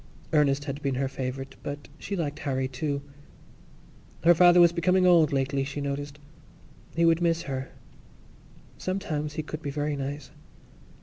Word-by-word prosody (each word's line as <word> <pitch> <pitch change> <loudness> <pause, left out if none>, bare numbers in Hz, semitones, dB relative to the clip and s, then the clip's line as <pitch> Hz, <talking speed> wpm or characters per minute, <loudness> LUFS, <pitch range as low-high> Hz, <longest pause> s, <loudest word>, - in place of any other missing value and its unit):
Ernest 145 -2 +3
had 145 0 -5
been 140 -2 -1
her 135 +1 0
favourite 135 0 -5
but 145 0 -6
she 200 - -4
liked 150 -4 -3
Harry 130 -2 -1
too. 140 +2 -3 1.2
Her 170 +1 +7
father 175 +1 +6
was 170 -1 +7
becoming 180 +2 +2
old 170 -4 +5
lately, 135 0 0
she 140 +2 -5
noticed; 140 +1 -4 0.8
he 170 0 +3
would 165 +1 +4
miss 170 -1 +1
her. 135 -1 -4 1.1
Sometimes 155 -6 -3
he 155 - -3
could 155 +1 -6
be 145 - -4
very 145 +1 -2
nice. 140 0 -5
145 Hz, 150 wpm, -27 LUFS, 140-165 Hz, 1.2 s, Her